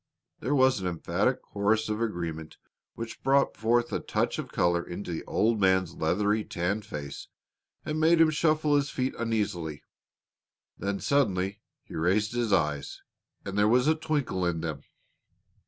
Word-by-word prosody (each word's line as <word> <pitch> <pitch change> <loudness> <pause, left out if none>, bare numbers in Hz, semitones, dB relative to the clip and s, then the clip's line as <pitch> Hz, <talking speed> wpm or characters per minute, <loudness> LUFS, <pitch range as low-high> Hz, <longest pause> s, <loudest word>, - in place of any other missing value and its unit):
There 135 +6 0
was 130 -3 +4
an 95 - -3
emphatic 85 -2 0
chorus 110 +2 0
of 110 +1 -2
agreement 85 -7 -4 0.4
which 115 0 -7
brought 135 +1 +3 0.4
a - - 0
touch - - -1
of - - -6
color 85 0 +2
into 90 +1 -6
the 80 - -4
old 110 0 +1
man's 95 -2 +3
leathery, 105 +6 +1
tanned 100 +4 -2
face 70 -4 -6 0.6
and 155 0 -2
made 165 +1 +4
him 160 -1 +6
shuffle 155 -1 +2
his 140 -1 +1
feet 130 -1 -2
uneasily. 100 -10 -2 0.9
Then 100 0 -3
suddenly 100 -9 +1 0.2
he - - -13
raised 100 +7 +1
his 120 -3 0
eyes 75 -6 0 0.4
and 100 - -5
there 105 0 +4
was 125 +3 +4
a 155 - +5
twinkle 150 - -1
in 85 -2 0
them. 80 -5 -4
105 Hz, 155 wpm, -28 LUFS, 85-130 Hz, 0.9 s, him